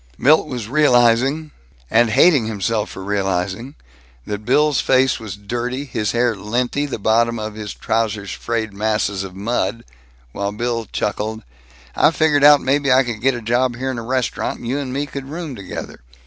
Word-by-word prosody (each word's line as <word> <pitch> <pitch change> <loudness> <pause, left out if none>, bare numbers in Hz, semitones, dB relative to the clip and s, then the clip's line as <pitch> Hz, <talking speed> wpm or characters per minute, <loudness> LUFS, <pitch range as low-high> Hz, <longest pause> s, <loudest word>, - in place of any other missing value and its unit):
Milt 155 +3 +4
was 125 -6 -5
realizing 135 +2 +3 0.4
and 115 - +3
hating 135 0 +4
himself 110 0 -1
for 95 - -8
realizing 100 +5 -2 0.5
that 105 0 -5
Bill's 150 +3 +3
face 130 0 +2
was 105 -4 -7
dirty, 120 +6 -4
his 110 -6 -2
hair 120 -1 +1
linty, 120 +8 -1
the 140 - -4
bottoms 115 +2 +1
of 110 0 -5
his 105 -1 -6
trousers 110 -3 -2
frayed 110 -3 -3
masses 105 -1 -1
of 95 -1 -9
mud, 115 +3 -2 0.5
while 100 +6 -3
Bill 115 +1 -3
chuckled: 110 +1 -3 0.5
"I - - +5
figured 150 -2 +2
out 145 -1 +8
maybe 140 0 +1
I 130 +1 +5
could 120 -4 -5
get 135 +1 +2
a 120 - -7
job 120 +2 +1
here 130 +2 -3
in 125 - -4
a - - -6
restaurant, 130 +1 -2
and 120 - -8
you 135 +4 -1
and 135 -3 -4
me 140 +3 -2
could 140 -1 -7
room 160 -1 -5
together. 100 -4 -7
120 Hz, 175 wpm, -20 LUFS, 105-135 Hz, 0.5 s, out